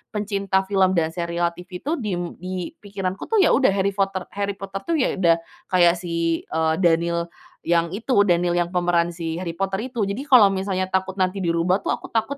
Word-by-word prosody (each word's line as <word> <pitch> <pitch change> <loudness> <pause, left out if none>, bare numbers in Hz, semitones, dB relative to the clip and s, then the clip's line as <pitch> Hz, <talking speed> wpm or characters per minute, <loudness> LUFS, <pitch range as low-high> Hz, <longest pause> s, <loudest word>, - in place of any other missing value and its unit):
pencinta 200 -2 0
film 190 -1 +2
dan 160 -1 +1
serial 170 0 -1
TV 180 +1 -10
itu, 295 - -2
diem 185 -6 -2 0.2
di 185 0 -5
pikiranku, 195 -2 -5
tuh, 435 -4 +3
ya, - - +4
udah 260 -6 +4
Harry 200 0 +1
Potter 195 -2 -1
Harry 200 0 -3
Potter, 195 0 -6
tuh, 335 - +1
ya, 275 -5 +2
udah 170 -3 +5 0.3
kayak 175 -1 +4
si, 170 -1 -1
eee, 160 0 0
Daniel 170 -1 +2 0.4
yang 170 0 +2
itu, 220 +8 -3
Daniel 175 -3 +2
yang 175 0 0
pemeran 175 -1 +1
si 165 0 -4
Harry 170 -2 -5
Potter 195 +1 -1
itu. 235 -5 -1
Jadi 200 +6 -3
kalau 210 -7 +7
misalnya 190 -1 -1
takut 190 +1 -2
nanti 185 +1 0
dirubah, 170 +2 +1
tuh, - - -4
aku - - -3
takut 230 +5 -1
185 Hz, 200 wpm, -23 LUFS, 170-200 Hz, 0.4 s, kalau